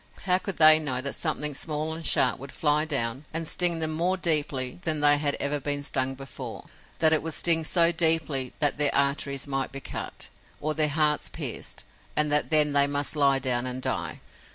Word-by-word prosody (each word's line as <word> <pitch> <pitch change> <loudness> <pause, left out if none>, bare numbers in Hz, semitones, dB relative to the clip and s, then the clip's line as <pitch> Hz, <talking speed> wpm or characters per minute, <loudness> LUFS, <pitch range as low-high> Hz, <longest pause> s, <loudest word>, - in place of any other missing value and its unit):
How 185 -1 +1
could 195 -1 -7
they 155 0 +7
know 135 -5 -3
that 140 +2 -3
something 150 -2 -3
small 155 +2 -1
and 165 +1 -8
sharp 130 -3 +3
would 135 +1 -10
fly 150 0 +1
down 135 -2 -2
and 165 0 -4
sting 175 0 +2
them 160 -1 -2
more 175 +4 -1
deeply 150 -6 -1
than 160 -3 -2
they 145 0 +4
had 145 -1 +1
ever 145 +1 -2
been 145 +1 -3
stung 135 -1 -2
before, 135 -1 -10 0.3
that 160 -1 +5
it 155 - +1
would 160 0 -4
sting 165 -2 +3
so 170 +1 +3
deeply 160 -6 +2
that 145 -1 0
their 145 -1 +5
arteries 140 -1 -1
might 135 -2 -3
be 135 - -7
cut, - - -8 0.3
or 155 +1 -2
their 155 -1 +2
hearts 150 0 0
pierced - - -6 0.3
and 150 -1 +1
that 150 0 +1
then 150 -2 +5
they 140 0 +4
must 145 +1 -2
lie 140 -2 +2
down 130 -2 -1
and 130 0 -6
die? - - -4
150 Hz, 200 wpm, -25 LUFS, 140-160 Hz, 0.3 s, they